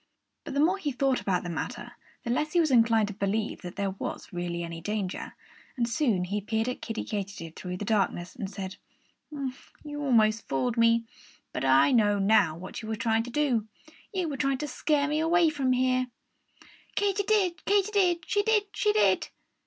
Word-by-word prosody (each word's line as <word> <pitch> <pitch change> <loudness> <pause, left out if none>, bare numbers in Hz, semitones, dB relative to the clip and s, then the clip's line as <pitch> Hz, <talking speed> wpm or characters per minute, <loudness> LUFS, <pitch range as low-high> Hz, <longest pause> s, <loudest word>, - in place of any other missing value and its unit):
But - - -6
the - - +1
more 355 +6 +3
he 295 -6 -2
thought 265 0 +1
about 185 -2 0
the 175 - -5
matter, 165 - -5 0.3
the 235 - -2
less 305 +5 0
he 350 - +4
was 315 -4 +3
inclined 225 -3 +4
to - - -5
believe 210 +2 -2
that 180 -1 -8
there 200 -1 -1
was 195 - -6
really 175 -1 -3
any 170 -1 -6
danger. 200 0 -3 0.4
And 235 -1 +1
soon 235 - +1
he 200 +3 -2
peered 220 +3 -1
at 250 - -3
Kiddie 225 - -4
Katydid 195 -6 -5
through 180 -1 -5
the 205 - -5
darkness 195 -4 0
and 200 -6 -5
said: 190 -1 -6 0.5
"You 290 +1 -7
almost 225 -5 +3
fooled 225 - 0
me. 230 0 +4 0.5
But - - -2
I 135 - +5
know 210 -4 +4
now 195 -5 +3
what 185 +2 -7
you 220 - -8
were 220 - -2
trying 225 +1 +1
to - - -7
do. 245 -5 +1 0.4
You 370 -4 -1
were 285 -3 -4
trying 275 -1 +1
to 300 - -4
scare 285 +1 +1
me 300 +1 0
away 330 +1 +4
from 275 -4 0
here!" 255 0 +2 0.9
"_Katy 405 0 +1
did, 375 -6 +2
Katy 405 +1 +2
did; 360 -5 +2
she 410 - +2
did, 425 0 +3
she 420 - +2
did! 430 - +3
235 Hz, 195 wpm, -28 LUFS, 200-300 Hz, 0.9 s, I